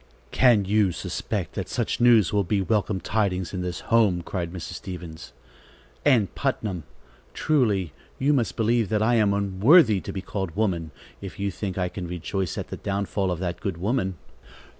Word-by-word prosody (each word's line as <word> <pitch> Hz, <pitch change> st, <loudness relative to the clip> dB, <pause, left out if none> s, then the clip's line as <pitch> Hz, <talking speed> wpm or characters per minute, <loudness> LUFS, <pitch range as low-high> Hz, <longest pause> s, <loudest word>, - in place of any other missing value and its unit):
"Can 120 Hz, -6 st, +4 dB
you 100 Hz, -1 st, +3 dB
suspect -, -, -4 dB
that -, -, -4 dB
such -, -, -2 dB
news 115 Hz, -7 st, +5 dB
will 100 Hz, -1 st, +3 dB
be 100 Hz, +3 st, 0 dB
welcome 100 Hz, +1 st, 0 dB
tidings 95 Hz, -2 st, -1 dB
in 90 Hz, -, -3 dB
this 90 Hz, -1 st, -4 dB
home?" 105 Hz, -7 st, +2 dB
cried 85 Hz, -2 st, -4 dB
Mrs. 90 Hz, -2 st, -6 dB
Stevens. 80 Hz, -9 st, -8 dB, 0.7 s
"Ann 125 Hz, -8 st, +4 dB
Putnam, 105 Hz, -, -2 dB, 0.5 s
truly 105 Hz, -, +1 dB, 0.2 s
you 140 Hz, +3 st, +2 dB
must 125 Hz, -5 st, 0 dB
believe 115 Hz, -1 st, +2 dB
that 110 Hz, -1 st, +1 dB
I 120 Hz, +2 st, +3 dB
am 110 Hz, -4 st, +3 dB
unworthy 100 Hz, -, +4 dB
to -, -, -6 dB
be 95 Hz, -, -4 dB
called 95 Hz, -6 st, -4 dB
woman, 90 Hz, -7 st, 0 dB, 0.3 s
if 95 Hz, -1 st, -8 dB
you 100 Hz, 0 st, -1 dB
think 95 Hz, 0 st, -5 dB
I 90 Hz, -1 st, 0 dB
can 90 Hz, 0 st, -6 dB
rejoice 90 Hz, +1 st, -3 dB
at -, -, -5 dB
the -, -, -5 dB
downfall 100 Hz, -1 st, -2 dB
of 90 Hz, -, -1 dB
that 90 Hz, -2 st, -3 dB
good 95 Hz, -4 st, -3 dB
woman." 95 Hz, -1 st, -1 dB
100 Hz, 175 wpm, -25 LUFS, 90-110 Hz, 0.7 s, news